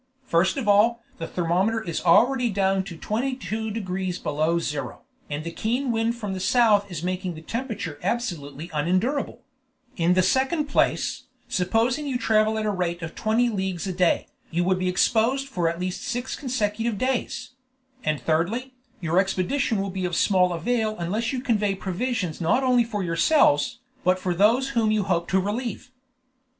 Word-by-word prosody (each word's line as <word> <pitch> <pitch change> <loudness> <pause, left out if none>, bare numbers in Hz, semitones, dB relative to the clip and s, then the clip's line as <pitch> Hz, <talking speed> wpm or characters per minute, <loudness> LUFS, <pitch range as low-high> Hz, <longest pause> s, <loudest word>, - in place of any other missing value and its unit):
First 185 +1 +2
of 250 -6 -3
all, 225 +3 +4 0.2
the 165 - -4
thermometer 185 +6 +1
is 170 -7 -4
already 245 +8 +4
down 195 -1 +1
to 175 -5 -8
22 225 0 -2
degrees 185 -4 -3
below 155 +2 0
zero, 150 -4 -4 0.3
and 145 +1 -3
the 170 - -5
keen 240 +9 -1
wind 225 +1 0
from 210 -5 -4
the 190 - -4
south 205 -1 +3
is 170 -3 -5
making 185 -1 -2
the 160 - -10
temperature 220 - -4
absolutely 170 - -3
unendurable; 185 - 0 0.5
in 175 +1 +3
the 185 - +4
second 265 - +2
place, 290 - 0 0.2
supposing 230 +10 +1
you 260 -3 0
travel 220 -2 +2
at 220 - -1
the 210 - +1
rate 175 -3 -2
of 160 - -5
twenty 225 +3 +1
leagues 190 -5 -2
a 190 - -2
day, 180 -1 +2 0.2
you 175 +2 0
would 185 +1 +1
be 185 0 0
exposed 240 +8 +2
for 175 -10 0
at 170 +1 -4
least 180 0 -3
six 250 -1 -3
consecutive 225 -4 -1
days; 255 +1 -2 0.5
and 155 -1 0
thirdly, 205 +12 -1 0.3
your 170 +1 +2
expedition 200 +5 0
will 195 0 -2
be 190 0 -4
of 175 -1 -2
small 180 -2 +3
avail 220 +5 0
unless 205 +7 -1
you 260 -2 -2
convey 210 -6 +1
provisions 190 -2 -3
not 245 +11 +2
only 250 -2 +4
for 210 -4 -3
yourselves, 170 - +3 0.2
but 185 0 +3
for 185 -1 -1
those 230 +9 +3
whom 230 -5 +1
you 215 -1 +2
hope 170 -3 0
to 190 - +2
relieve." 230 +5 -3
200 Hz, 170 wpm, -25 LUFS, 175-235 Hz, 0.5 s, all